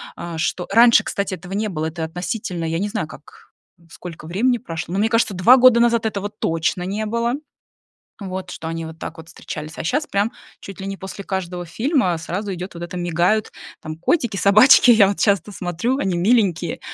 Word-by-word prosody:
А, 170 Hz, -2 st, -6 dB
что 175 Hz, +3 st, -2 dB
раньше, 235 Hz, +3 st, +6 dB
кстати, 200 Hz, -1 st, -3 dB
этого 180 Hz, +2 st, -10 dB
не 215 Hz, +2 st, -1 dB
было, 160 Hz, -4 st, -3 dB
это 160 Hz, +1 st, -4 dB
относительно, 180 Hz, +2 st, -4 dB
я 165 Hz, +1 st, -1 dB
не 205 Hz, +2 st, -1 dB
знаю, 205 Hz, -6 st, -3 dB
как, 150 Hz, -, -15 dB, 0.4 s
сколько 165 Hz, -3 st, -10 dB
времени 240 Hz, +9 st, +1 dB
прошло. 170 Hz, -6 st, -6 dB
Но 195 Hz, -, 0 dB
мне 215 Hz, -, +3 dB
кажется, 230 Hz, -2 st, +1 dB
2 230 Hz, +9 st, +6 dB
года 250 Hz, -2 st, +6 dB
назад 235 Hz, -1 st, +2 dB
этого 200 Hz, -2 st, -4 dB
вот 205 Hz, +1 st, -7 dB
точно 165 Hz, +2 st, -1 dB
не 205 Hz, +4 st, -3 dB
было, 235 Hz, +2 st, -1 dB, 0.9 s
вот, 185 Hz, -2 st, -6 dB
что 160 Hz, -, -7 dB
они 165 Hz, 0 st, -4 dB
вот 160 Hz, 0 st, -10 dB
так 165 Hz, 0 st, -7 dB
вот 160 Hz, 0 st, -11 dB
встречались. 155 Hz, -1 st, -8 dB
А -, -, -5 dB
щас 290 Hz, -, 0 dB
прям 200 Hz, +3 st, 0 dB, 0.3 s
чуть 195 Hz, 0 st, -10 dB
ли 195 Hz, -, -5 dB
не 195 Hz, 0 st, -4 dB
после 190 Hz, +1 st, -8 dB
каждого 180 Hz, -2 st, -4 dB
фильма 235 Hz, -, 0 dB
сразу 195 Hz, +5 st, -4 dB
идёт 180 Hz, +2 st, -7 dB
вот 170 Hz, -, -8 dB
это, 175 Hz, +1 st, -6 dB
мигают 175 Hz, +5 st, 0 dB, 0.3 s
там 155 Hz, -1 st, -6 dB
котики, 225 Hz, -, 0 dB
собачки, 215 Hz, +7 st, +7 dB
я 220 Hz, -4 st, +7 dB
вот 200 Hz, -, -2 dB
часто 200 Hz, -1 st, +1 dB
смотрю, 185 Hz, +8 st, -2 dB
они 190 Hz, -9 st, -1 dB
миленькие. 180 Hz, -4 st, +1 dB
190 Hz, 200 wpm, -21 LUFS, 170-220 Hz, 0.9 s, собачки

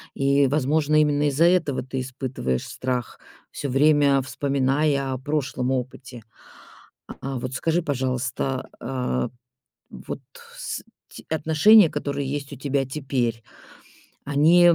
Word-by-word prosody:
И, 140 Hz, 0 st, +3 dB
возможно, 150 Hz, +2 st, +1 dB
именно 150 Hz, -1 st, +2 dB
из-за 150 Hz, +5 st, +3 dB
этого 170 Hz, -8 st, +2 dB
ты 130 Hz, +1 st, -4 dB
испытываешь 130 Hz, -, -3 dB
страх, 125 Hz, -2 st, -3 dB, 0.3 s
всё 140 Hz, -, -4 dB
время 140 Hz, 0 st, +4 dB
вспоминая 140 Hz, 0 st, 0 dB
о -, -, -3 dB
прошлом 135 Hz, -2 st, -2 dB
опыте. 130 Hz, -2 st, -5 dB, 0.9 s
А -, -, -7 dB
а 135 Hz, -1 st, -3 dB
вот 130 Hz, +1 st, -5 dB
скажи, 165 Hz, +5 st, 0 dB
пожалуйста. 130 Hz, -1 st, -2 dB
Э, 120 Hz, -, -2 dB, 0.6 s
вот -, -, -7 dB, 0.4 s
с -, -, -5 dB, 0.3 s
те -, -, -12 dB
отношения, 160 Hz, +5 st, +6 dB
которые 140 Hz, -2 st, -3 dB
есть 145 Hz, 0 st, -4 dB
у -, -, -6 dB
тебя 140 Hz, 0 st, -1 dB
теперь, 130 Hz, -5 st, -2 dB, 0.8 s
они, 160 Hz, +5 st, +5 dB
м, 170 Hz, -1 st, +7 dB
140 Hz, 125 wpm, -24 LUFS, 130-150 Hz, 0.9 s, м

